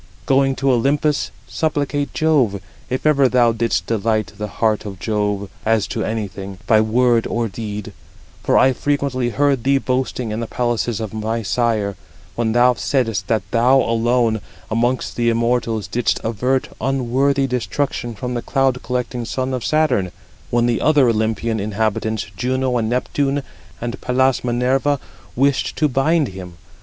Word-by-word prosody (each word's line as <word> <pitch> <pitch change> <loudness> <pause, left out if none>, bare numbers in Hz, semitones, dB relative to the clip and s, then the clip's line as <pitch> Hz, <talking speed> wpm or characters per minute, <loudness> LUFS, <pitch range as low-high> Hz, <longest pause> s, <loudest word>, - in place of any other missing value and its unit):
Going 135 0 +3
to 135 0 +1
Olympus, 140 +4 +1 0.2
supplicate 145 -2 -1
Jove, 135 -11 +2 0.3
if 130 +3 -3
ever 140 -4 +4
thou 120 -2 +4
didst 115 0 0
delight 110 -1 0
the 105 +1 -4
heart 110 +1 0
of 100 -3 -7
Jove 105 0 -1 0.2
as 110 -2 +2
to - - -2
anything, 100 -3 -4
by 110 -1 +5
word 120 +1 +2
or 115 0 -1
deed; 105 0 -6 0.5
for - - +2
I 130 - +5
frequently 140 -3 -1
heard 140 -1 +1
thee 135 +1 +3
boasting 130 -3 -2
in 110 - -3
the 115 - -3
palaces 120 -2 -1
of 110 -2 -5
my 110 +1 -2
sire, 110 -2 0 0.4
when 115 -2 0
thou 125 +1 +5
saidest 115 -6 -1
that 110 -2 +1
thou 125 +3 +4
alone, 115 -1 +1 0.3
amongst 120 +3 0
the 120 -1 +2
immortals, 115 -2 0
didst 115 +5 0
avert 125 +4 0
unworthy 135 +2 +1
destruction 125 -1 -2
from 125 +4 -4
the 120 - -2
cloud 135 -1 +1
collecting 125 -1 -3
son 130 +3 -2
of 125 -3 -3
Saturn, 135 - +1 0.4
when 120 +2 +2
the 120 -1 +1
other 145 -5 +4
Olympian 110 0 0
inhabitants, 110 +1 -1
Juno, 130 +4 0
and 110 -2 0
Neptune, 135 +3 0 0.4
and 120 +1 -5
Pallas 130 +1 +1
Minerva, 130 +4 +1 0.4
wished 135 +2 +1
to 155 - +2
bind 145 +2 +2
him. 90 -2 -9
120 Hz, 150 wpm, -20 LUFS, 110-130 Hz, 0.5 s, by